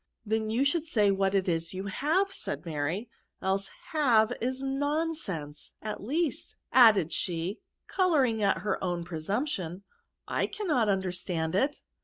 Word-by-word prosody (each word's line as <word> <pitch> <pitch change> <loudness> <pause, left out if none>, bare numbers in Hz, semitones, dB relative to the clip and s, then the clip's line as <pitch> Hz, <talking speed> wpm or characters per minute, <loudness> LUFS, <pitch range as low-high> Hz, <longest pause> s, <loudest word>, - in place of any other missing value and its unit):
" - - -48
Then 220 0 0
you 240 +5 +2
should 320 +3 +1
say 210 -8 +3
what 195 0 +1
it 190 -1 +1
is 165 +1 -1
you 190 - -3
have^ 310 - +1
said - - -5
Mary, 165 +7 -2 0.2
" - - -51
else 195 +1 +1 0.2
have 245 -7 +4
is 260 +3 -2
nonsense,— 270 - -2
at 215 -1 -5
least/* 300 +6 -2 0.2
added 215 -9 +6
she, 175 +4 -1 0.3
colouring 280 - +2
at 200 -1 +2
her 205 -2 -1
own 175 -2 -1
presumption, 180 - -3 0.2
" - - -55
I - - 0
cannot 315 - 0
understand 180 -4 -1
it." 270 +10 +1
210 Hz, 155 wpm, -29 LUFS, 185-275 Hz, 0.3 s, added